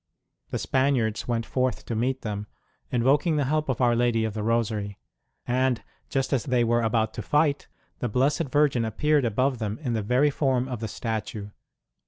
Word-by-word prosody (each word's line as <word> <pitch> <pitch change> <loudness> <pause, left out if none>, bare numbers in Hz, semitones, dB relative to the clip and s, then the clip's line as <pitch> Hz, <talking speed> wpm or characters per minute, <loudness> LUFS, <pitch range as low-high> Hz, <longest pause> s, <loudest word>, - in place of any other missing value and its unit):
The - - -2
Spaniards 130 -5 +1
went 115 -2 -1
forth 130 -1 -1
to - - -4
meet 125 +4 -1
them, 105 -2 -4 0.4
invoking 140 +7 +2
the 145 - +2
help 155 +1 0
of 130 - -1
Our 120 -1 +4
Lady 120 -1 +2
of 110 - -3
the 110 - -3
Rosary; 105 -3 -1 0.5
and 125 -1 +1 0.3
just 135 -1 0
as 130 - +1
they 125 -3 +2
were 120 +1 +2
about 110 -1 +1
to - - -5
fight, 150 -1 +1 0.3
the 125 - -1
Blessed 140 +6 +1
Virgin 145 -4 +3
appeared 145 +6 +1
above 125 +3 +1
them 110 -1 -3
in 125 -4 -1
the 110 - 0
very 125 +8 +3
form 130 -3 +1
of 125 -4 -4
the 110 - -3
statue. 110 -1 -4
120 Hz, 185 wpm, -26 LUFS, 110-135 Hz, 0.5 s, Our